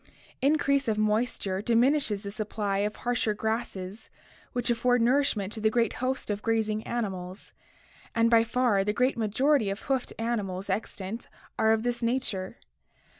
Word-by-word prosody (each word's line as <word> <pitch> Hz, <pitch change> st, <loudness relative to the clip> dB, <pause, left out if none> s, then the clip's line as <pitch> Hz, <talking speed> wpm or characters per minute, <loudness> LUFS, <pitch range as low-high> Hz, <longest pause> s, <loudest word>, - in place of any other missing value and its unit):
Increase 280 Hz, -1 st, +2 dB
of 215 Hz, -1 st, +1 dB
moisture 215 Hz, -3 st, 0 dB
diminishes 235 Hz, -1 st, +2 dB
the 200 Hz, -, -5 dB
supply 205 Hz, -2 st, -2 dB
of 210 Hz, +1 st, -1 dB
harsher 240 Hz, -3 st, 0 dB
grasses 220 Hz, -2 st, -4 dB, 0.4 s
which 245 Hz, 0 st, 0 dB
afford 245 Hz, +1 st, +2 dB
nourishment 235 Hz, -6 st, +2 dB
to 220 Hz, -, -4 dB
the 220 Hz, -, +4 dB
great 230 Hz, +1 st, +1 dB
host 260 Hz, -3 st, -1 dB
of 205 Hz, 0 st, -3 dB
grazing 220 Hz, -1 st, 0 dB
mammals, 190 Hz, -5 st, -4 dB, 0.6 s
and 230 Hz, 0 st, +4 dB
by 230 Hz, -1 st, +6 dB
far 230 Hz, -4 st, +2 dB
the 210 Hz, +1 st, 0 dB
great 250 Hz, +4 st, +2 dB
majority 230 Hz, +2 st, +2 dB
of 195 Hz, +2 st, -4 dB
hoofed 265 Hz, -2 st, -1 dB
animals 205 Hz, -5 st, -2 dB
extant 210 Hz, +1 st, -4 dB, 0.3 s
are 220 Hz, 0 st, +4 dB
of 220 Hz, 0 st, +2 dB
this 245 Hz, 0 st, -1 dB
nature. 230 Hz, -6 st, -2 dB
225 Hz, 150 wpm, -28 LUFS, 205-245 Hz, 0.6 s, by